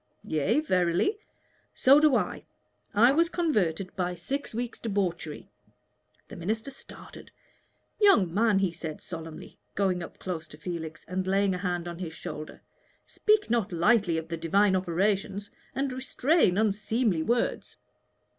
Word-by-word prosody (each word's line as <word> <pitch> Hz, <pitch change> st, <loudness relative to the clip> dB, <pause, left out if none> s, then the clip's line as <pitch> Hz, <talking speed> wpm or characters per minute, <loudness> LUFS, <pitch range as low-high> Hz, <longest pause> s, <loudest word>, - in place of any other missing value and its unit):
"Yea, 160 Hz, -, +1 dB
verily." 185 Hz, -, +1 dB, 0.6 s
"So 275 Hz, +3 st, +6 dB
do 300 Hz, -3 st, +5 dB
I. -, -, -1 dB, 0.5 s
I 235 Hz, +5 st, +6 dB
was 335 Hz, +4 st, +3 dB
converted 195 Hz, -, 0 dB
by 180 Hz, -1 st, -1 dB
six 270 Hz, +12 st, -4 dB
weeks' 240 Hz, +1 st, -4 dB
debauchery." 185 Hz, -8 st, -3 dB, 0.8 s
The -, -, -10 dB
minister 220 Hz, +9 st, -3 dB
started. 275 Hz, -, -12 dB, 0.7 s
"Young 230 Hz, -, +5 dB
man," 215 Hz, 0 st, +3 dB
he 195 Hz, -2 st, +1 dB
said, 160 Hz, -2 st, -6 dB
solemnly, 160 Hz, -3 st, -9 dB, 0.2 s
going 190 Hz, -3 st, +1 dB
up -, -, -9 dB
close 170 Hz, -4 st, -5 dB
to 150 Hz, -, -13 dB
Felix 160 Hz, -1 st, -6 dB
and 185 Hz, +2 st, -2 dB
laying 195 Hz, 0 st, +2 dB
a 180 Hz, -, -3 dB
hand 175 Hz, -2 st, -2 dB
on 170 Hz, 0 st, -6 dB
his 165 Hz, -3 st, -5 dB
shoulder, 155 Hz, -3 st, -8 dB, 0.4 s
"speak 425 Hz, -, +1 dB
not 230 Hz, -5 st, +1 dB
lightly 175 Hz, 0 st, +3 dB
of 160 Hz, 0 st, -4 dB
the 165 Hz, 0 st, -4 dB
Divine 190 Hz, +4 st, +3 dB
operations, 195 Hz, +3 st, -1 dB, 0.2 s
and 270 Hz, -1 st, -1 dB
restrain 260 Hz, -, +2 dB
unseemly 215 Hz, -2 st, +1 dB
words." 235 Hz, +7 st, -1 dB
195 Hz, 140 wpm, -28 LUFS, 170-235 Hz, 0.8 s, So